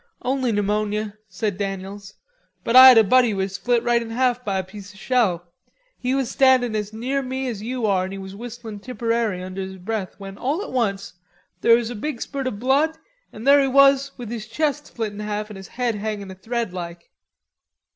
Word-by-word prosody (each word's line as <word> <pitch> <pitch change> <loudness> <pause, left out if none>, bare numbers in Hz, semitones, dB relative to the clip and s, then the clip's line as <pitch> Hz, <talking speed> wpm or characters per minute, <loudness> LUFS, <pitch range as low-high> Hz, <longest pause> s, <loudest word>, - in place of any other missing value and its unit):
"Only 260 -1 0
pneumonia," 210 0 -1
said 190 +1 -3
Daniels, 195 0 -5 0.5
"but 230 - 0
I 260 0 +12
had 255 -3 +9
a 225 - +8
buddy 250 +3 +4
who 210 - -2
was 190 0 -2
split 240 +4 0
right 240 -1 +2
in 230 - -6
half 250 +1 0
by 195 -4 -1
a 190 - -1
piece 195 +1 -11
of 205 - -15
a - - -15
shell. 185 -8 0 0.4
He 255 +1 -1
was 270 -2 0
standin' 255 -4 +4
as 210 -1 -2
near 255 +5 -2
me 260 0 -3
as 225 -5 -4
you 245 +1 -3
are 190 -3 +2
an' 195 +1 -6
was 190 0 -8
whistlin' 230 -1 -8
'Tipperary' 230 -4 -2
under 185 +1 -6
his 190 0 -6
breath 195 0 -4
when 195 0 -9
all 295 +10 -1
at - - -8
once 200 -7 -1 0.5
there 230 - +6
was 235 0 -1
a - - -5
big 245 +3 -4
spurt 275 +1 -4
o' - - +2
blood 270 +8 +1 0.3
an' 215 - -10
there 280 +2 +6
he 270 - +2
was 275 +1 +5
with 240 -3 -7
his 230 -2 -5
chest 295 +4 -1
split 220 -3 -4
in 205 - -9
half 210 0 -4
an' - - -8
his 190 -1 -10
head 245 +2 -1
hangin' 205 -2 -4
a - - -7
thread 225 +1 -3
like." 170 -1 -7
225 Hz, 215 wpm, -22 LUFS, 200-255 Hz, 0.5 s, I